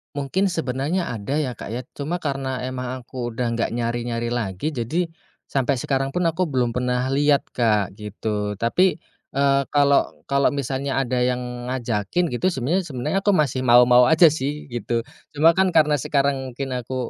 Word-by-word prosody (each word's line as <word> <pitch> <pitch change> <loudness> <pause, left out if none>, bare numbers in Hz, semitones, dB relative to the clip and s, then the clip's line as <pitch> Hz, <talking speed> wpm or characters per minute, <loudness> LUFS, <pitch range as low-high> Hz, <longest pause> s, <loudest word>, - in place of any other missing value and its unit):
Mungkin 145 +8 0
sebenarnya 160 0 -2
ada 115 +4 -3
ya, 150 -4 0
Kak, 120 - -8
ya, 125 +2 -4
cuma 150 +4 -4
karena 135 -3 -2
emang 130 0 -4
aku 120 -1 -5
udah 120 0 -1
nggak 115 - 0
nyari-nyari 120 0 -2
lagi, 115 - -2
jadi 155 +7 -2 0.4
sampai 135 0 0
sekarang 135 +1 -1
pun 180 - +1
aku 170 +2 0
belum 125 -5 0
pernah 125 +1 -1
lihat, 145 +1 +3
Kak, 105 -5 +1
gitu. 105 0 -3
Tapi, 145 - +2 0.4
eee, 140 0 +3
kalau 140 -1 +2
kalau 140 0 +3
misalnya 140 -1 -2
ada 125 0 -1
yang 125 -1 -2
ngajakin 120 - -1
gitu 125 +9 0
sebenarnya 165 +6 0
sebenarnya 150 +7 -1
aku 205 - +4
masih 140 -6 +1
mau-mau 125 0 +6
aja 160 +1 +7
sih 145 0 -4
gitu. 120 0 -2 0.3
Cuma 160 +3 +6
kan 190 -1 +3
karena 150 -2 +5
sekarang 135 -1 0
mungkin 135 +2 -5
aku 125 +1 -5
130 Hz, 165 wpm, -22 LUFS, 120-145 Hz, 0.4 s, aja